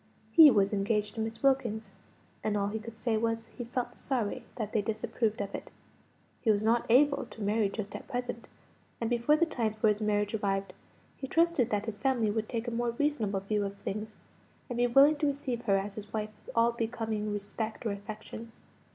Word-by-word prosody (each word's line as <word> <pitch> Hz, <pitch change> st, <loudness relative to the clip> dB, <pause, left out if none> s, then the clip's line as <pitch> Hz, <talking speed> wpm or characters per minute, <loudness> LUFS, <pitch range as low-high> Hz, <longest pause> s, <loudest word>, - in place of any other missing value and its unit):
He 320 Hz, -3 st, +10 dB
was 200 Hz, -4 st, +3 dB
engaged 210 Hz, +1 st, 0 dB
to 225 Hz, -, -3 dB
Miss 225 Hz, +3 st, -4 dB
Wilkins; 230 Hz, -6 st, +1 dB, 0.5 s
and 210 Hz, -1 st, +1 dB
all 200 Hz, 0 st, 0 dB
he 220 Hz, +2 st, -3 dB
could 225 Hz, 0 st, -9 dB
say 225 Hz, -1 st, 0 dB
was, 225 Hz, 0 st, -1 dB
he 240 Hz, -, -5 dB
felt 245 Hz, +1 st, -3 dB
sorry 245 Hz, -7 st, -2 dB
that 215 Hz, -3 st, -4 dB
they 215 Hz, -, +3 dB
disapproved 220 Hz, +1 st, -1 dB
of 200 Hz, -1 st, -4 dB
it. -, -, -6 dB, 0.7 s
He 225 Hz, -, 0 dB
was 210 Hz, 0 st, +3 dB
not 230 Hz, +1 st, +2 dB
able 280 Hz, +4 st, +4 dB
to 225 Hz, -, -11 dB
marry 210 Hz, 0 st, +2 dB
just 205 Hz, 0 st, -5 dB
at -, -, -8 dB
present, 245 Hz, -2 st, -4 dB, 0.5 s
and 230 Hz, 0 st, -2 dB
before 240 Hz, +5 st, +4 dB
the 335 Hz, -, +4 dB
time 230 Hz, -9 st, -1 dB
for 215 Hz, 0 st, +2 dB
his 210 Hz, +1 st, 0 dB
marriage 210 Hz, 0 st, +1 dB
arrived, 195 Hz, -2 st, -1 dB, 0.4 s
he 270 Hz, -, -5 dB
trusted 330 Hz, -5 st, +3 dB
that 210 Hz, 0 st, 0 dB
his 225 Hz, -2 st, -5 dB
family 245 Hz, -6 st, +2 dB
would 220 Hz, 0 st, -2 dB
take 235 Hz, 0 st, -3 dB
a -, -, -1 dB
more 235 Hz, 0 st, -1 dB
reasonable 225 Hz, -10 st, 0 dB
view 205 Hz, +1 st, 0 dB
of 200 Hz, 0 st, -4 dB
things, 215 Hz, +2 st, -5 dB, 0.6 s
and 240 Hz, -, -2 dB
be 245 Hz, 0 st, +3 dB
willing 280 Hz, +5 st, +6 dB
to 295 Hz, -, +1 dB
receive 265 Hz, -4 st, -2 dB
her 195 Hz, -3 st, +4 dB
as 195 Hz, +1 st, -3 dB
his 205 Hz, 0 st, -9 dB
wife 215 Hz, -1 st, -2 dB
with -, -, -11 dB
all 230 Hz, 0 st, +4 dB
becoming 225 Hz, -2 st, -2 dB
respect 210 Hz, +3 st, -4 dB
or 220 Hz, -, +1 dB
affection. 215 Hz, +3 st, -7 dB
225 Hz, 205 wpm, -30 LUFS, 210-240 Hz, 0.7 s, He